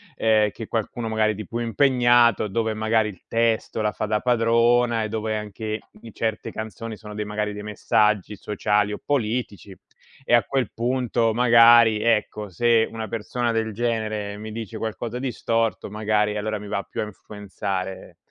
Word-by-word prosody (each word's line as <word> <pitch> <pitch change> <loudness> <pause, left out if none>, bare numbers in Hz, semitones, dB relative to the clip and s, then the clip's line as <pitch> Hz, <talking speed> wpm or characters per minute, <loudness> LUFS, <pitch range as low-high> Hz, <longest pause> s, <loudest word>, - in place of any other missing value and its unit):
ehm, 110 -1 +3
che 110 +1 -8
qualcuno 115 +1 -3
magari 110 -1 +1
di 105 -1 -8
più 115 - -4
impegnato, 120 -2 +3
dove 110 +2 -1
magari 110 0 +1
il 95 - -12
testo 115 -1 +1
la 105 - +1
fa 110 - -3
da 105 0 +1
padrona 120 -1 +3
,e 110 - -3
dove 110 0 -2
anche 105 +1 -5 0.3
certe 110 0 -3
canzoni 110 0 -6
sono 105 -1 -10
de 105 0 -3
magari 105 0 -3
dei 105 - -7
messaggi 105 -1 +1
sociali 105 +1 0
o - - -4
politici, 110 - -2 0.5
e - - 0
a 120 -3 +6
quel 130 -3 -1
punto 120 -1 0
magari 115 -2 +6
ecco 105 -2 0
se 115 +5 +3
una 110 -1 -5
persona 115 +2 -2
del 110 -1 -1
genere, 110 -2 -2
mi 110 +1 -7
dice 110 0 -6
qualcosa 115 +2 -4
di 130 -1 -2
storto 115 -3 -1
magari 105 0 0
allora 110 +1 -2
mi 105 - -9
va 100 -1 -2
più - - -5
a - - -1
influenzare, 95 -2 -6
110 Hz, 165 wpm, -23 LUFS, 105-115 Hz, 0.5 s, a